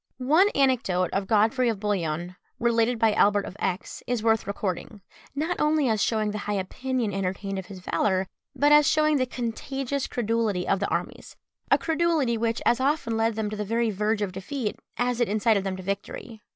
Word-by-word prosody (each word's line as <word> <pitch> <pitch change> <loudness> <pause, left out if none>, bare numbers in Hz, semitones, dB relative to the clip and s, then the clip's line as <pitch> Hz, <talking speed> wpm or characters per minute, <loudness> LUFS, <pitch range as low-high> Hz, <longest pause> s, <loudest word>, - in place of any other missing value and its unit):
One 310 +10 +4
anecdote 230 -10 +2
of 195 0 -1
Godfrey 225 +4 +3
of 220 -4 -2
Bouillon, 175 -4 -2 0.2
related 235 0 +2
by 220 -1 +3
Albert 205 -1 +3
of - - -8
Aix, 185 0 -3
is 245 -3 -1
worth 225 -2 +2
recording, 200 +1 -4 0.3
not 320 +5 -1
only 300 -2 +3
as 215 -2 +1
shewing 215 -2 0
the 210 - -4
high 205 - +1
opinion 230 +3 -2
entertained 195 +1 -3
of 185 - -8
his 190 -2 -10
valour, 190 0 0 0.3
but 290 +1 +3
as 295 -1 +7
shewing 305 -1 +3
the 255 -1 0
contagious 265 +3 -3
credulity 225 -5 -1
of 195 - +2
the 200 - -1
armies - - -4 0.3
a - - +6
credulity 320 -6 +1
which 230 0 -1
as 240 - +3
often 270 -4 0
led 225 0 +1
them 215 -1 -2
to - - -3
the 210 - -3
very 230 +2 0
verge 210 +1 0
of 195 - -2
defeat, 210 +5 -4 0.2
as 245 0 0
it 240 - +2
incited 215 -1 +2
them 190 -1 -3
to 185 - -8
victory. 205 +3 -5
225 Hz, 190 wpm, -26 LUFS, 200-255 Hz, 0.3 s, as